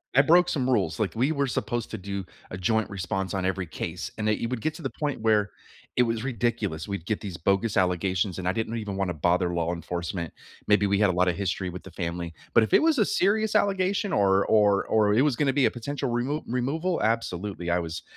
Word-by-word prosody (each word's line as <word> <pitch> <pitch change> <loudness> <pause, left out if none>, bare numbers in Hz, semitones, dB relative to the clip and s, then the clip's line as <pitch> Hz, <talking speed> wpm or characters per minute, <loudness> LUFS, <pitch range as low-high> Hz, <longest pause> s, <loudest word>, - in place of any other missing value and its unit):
I 135 - +8
broke 175 +4 +5
some 130 -4 0
rules. 100 -7 +1
Like, 105 - 0
we 130 +7 +2
were 140 -3 0
supposed 120 -1 -2
to 110 - -4
do 100 0 -5 0.3
a 95 - -5
joint 110 +3 +1
response 95 -1 -3
on 95 -1 -1
every 95 -1 -1
case, 85 +2 -5
and 110 -1 -1
that 110 - +1
you 115 - -1
would 125 -1 -2
get 155 - -1
to - - -9
the - - -2
point 145 -6 -2
where 105 -2 +2 0.4
it 125 - +5
was 115 -1 -1
ridiculous. 115 -9 -1
We'd 100 -4 -4
get 110 - -1
these 100 -4 -6
bogus 100 +5 +1
allegations 90 0 +1
and 90 - -3
I 90 - +2
didn't 115 +1 -2
even 105 -3 -4
wanna 95 -2 -1
bother 90 +3 +1
law 85 0 0
enforcement. 85 0 -4 0.3
Maybe 105 -1 +4
we 100 0 +2
had 105 -3 +4
a - - +1
lotta 90 0 +2
history 95 0 -2
with 90 +1 -8
the 95 - -11
family. 85 -1 -4 0.2
But 115 - +6
if 110 - -3
it - - +7
was 320 -2 +3
a 215 - +4
serious 215 +4 +1
allegation 195 +1 +1
or 100 -1 +3
or 105 -2 +4
or 105 -2 +3
it 120 - +4
was 145 -4 +2
gonna 140 +1 +2
be 135 -1 +3
a - - +3
potential 135 +2 -4
remove 130 +6 -1
removal, 150 +9 -1
absolutely. 105 -5 -1
I 90 - +2
was 85 +1 -5
105 Hz, 235 wpm, -26 LUFS, 90-125 Hz, 0.4 s, I